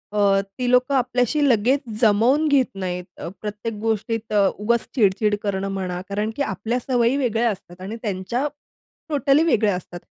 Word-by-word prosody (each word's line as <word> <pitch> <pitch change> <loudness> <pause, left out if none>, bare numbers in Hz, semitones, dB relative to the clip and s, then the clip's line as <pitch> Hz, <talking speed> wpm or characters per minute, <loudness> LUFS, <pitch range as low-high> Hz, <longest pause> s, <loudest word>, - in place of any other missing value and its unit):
अ, 200 -1 +4
ती 200 +6 -4
लोकं 250 +2 +3
आपल्याशी 250 +3 +1
लगेच 245 +5 +3 0.2
जमवून 240 +8 +4
घेत 280 -3 +4 0.2
नाहीत. 180 -1 -3
अ, - - -6
प्रत्येक 210 +2 -4
गोष्टीत 225 0 -2
अ, 205 -2 +4
उगाच 235 +3 +2 0.2
चिड-चिड 210 -1 +2
करणं 195 -1 -1
म्हणा 180 -2 -3
कारण, 210 +2 -1
की 285 - -4
आपल्या 225 +1 -1
सवयी 245 0 +1
वेगळ्या 235 -3 +1
असतात 185 -2 -10
आणि 205 +4 -5
त्यांच्या 215 +6 -2 0.6
टोटली 290 +1 +3
वेगळ्या 215 - +2
असतात. 175 -1 -7
220 Hz, 160 wpm, -22 LUFS, 200-250 Hz, 0.6 s, अ